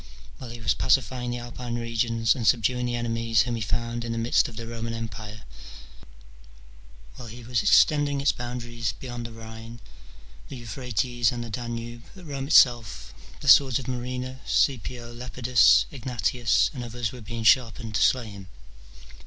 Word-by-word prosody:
While 125 Hz, -, -8 dB
he 120 Hz, 0 st, -8 dB
was 110 Hz, -, +1 dB
pacifying 125 Hz, -1 st, +1 dB
the 120 Hz, -, -3 dB
Alpine 120 Hz, 0 st, -6 dB
regions, 115 Hz, -1 st, +1 dB
and 115 Hz, -4 st, -3 dB
subduing 125 Hz, +1 st, +2 dB
the 120 Hz, -, -2 dB
enemies 115 Hz, -2 st, +1 dB
whom 120 Hz, -, -3 dB
he 115 Hz, -, -4 dB
found 115 Hz, +3 st, -2 dB
in 115 Hz, -, -4 dB
the 115 Hz, -, -3 dB
midst 115 Hz, +2 st, +2 dB
of 115 Hz, -, -13 dB
the 115 Hz, +1 st, -6 dB
Roman 115 Hz, 0 st, -5 dB
empire, 110 Hz, -1 st, -7 dB, 1.7 s
while 120 Hz, -, -9 dB
he 120 Hz, +2 st, -10 dB
was 120 Hz, -2 st, 0 dB
extending 145 Hz, +2 st, +4 dB
its 140 Hz, 0 st, +3 dB
boundaries 120 Hz, -3 st, -4 dB
beyond 120 Hz, -2 st, -6 dB
the -, -, -12 dB
Rhine, 115 Hz, +1 st, -10 dB, 0.7 s
the -, -, -7 dB
Euphrates, 120 Hz, 0 st, -1 dB
and 120 Hz, -1 st, -4 dB
the 115 Hz, -, -8 dB
Danube, 120 Hz, 0 st, -5 dB
at 185 Hz, -2 st, -13 dB
Rome 140 Hz, -3 st, -5 dB
itself 120 Hz, -7 st, +3 dB, 0.3 s
the -, -, -7 dB
swords 130 Hz, -4 st, +7 dB
of 130 Hz, -, -6 dB
Murena, 125 Hz, +1 st, -4 dB
Caepio, 120 Hz, -2 st, -1 dB
Lepidus, 125 Hz, 0 st, +3 dB
Egnatius, 120 Hz, -3 st, 0 dB
and 125 Hz, -4 st, -6 dB
others 120 Hz, -1 st, -4 dB
were 125 Hz, -, -10 dB
being 115 Hz, +1 st, -6 dB
sharpened 115 Hz, -1 st, +3 dB
to 100 Hz, -, 0 dB
slay 125 Hz, -3 st, +3 dB
him. 100 Hz, -2 st, -11 dB
120 Hz, 165 wpm, -26 LUFS, 115-125 Hz, 1.7 s, swords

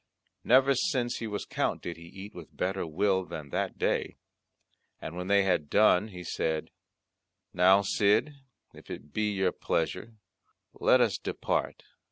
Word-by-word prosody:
Never 135 Hz, +3 st, +5 dB
since 130 Hz, -8 st, 0 dB
he 115 Hz, -, -4 dB
was 105 Hz, -1 st, -4 dB
Count -, -, -2 dB
did 85 Hz, -, -5 dB
he 85 Hz, -, -15 dB
eat 95 Hz, +4 st, -10 dB
with 85 Hz, -3 st, -12 dB
better 95 Hz, -1 st, -1 dB
will 95 Hz, +4 st, +1 dB
than 75 Hz, -5 st, -8 dB
that -, -, -2 dB
day! -, -, -1 dB, 0.8 s
And 80 Hz, -, -7 dB
when 90 Hz, +1 st, -5 dB
they 100 Hz, 0 st, +4 dB
had 90 Hz, -6 st, 0 dB
done 105 Hz, -1 st, +4 dB
he 90 Hz, -4 st, -9 dB
said, 80 Hz, -2 st, -2 dB, 0.8 s
"Now, 95 Hz, +3 st, +5 dB
Cid, 105 Hz, +9 st, +2 dB, 0.4 s
if -, -, -15 dB
it 75 Hz, +2 st, -9 dB
be 105 Hz, 0 st, 0 dB
your 95 Hz, -2 st, +1 dB
pleasure 90 Hz, +7 st, -2 dB, 0.6 s
let -, -, +4 dB
us -, -, +1 dB
depart." -, -, -2 dB
95 Hz, 155 wpm, -29 LUFS, 90-105 Hz, 0.8 s, Never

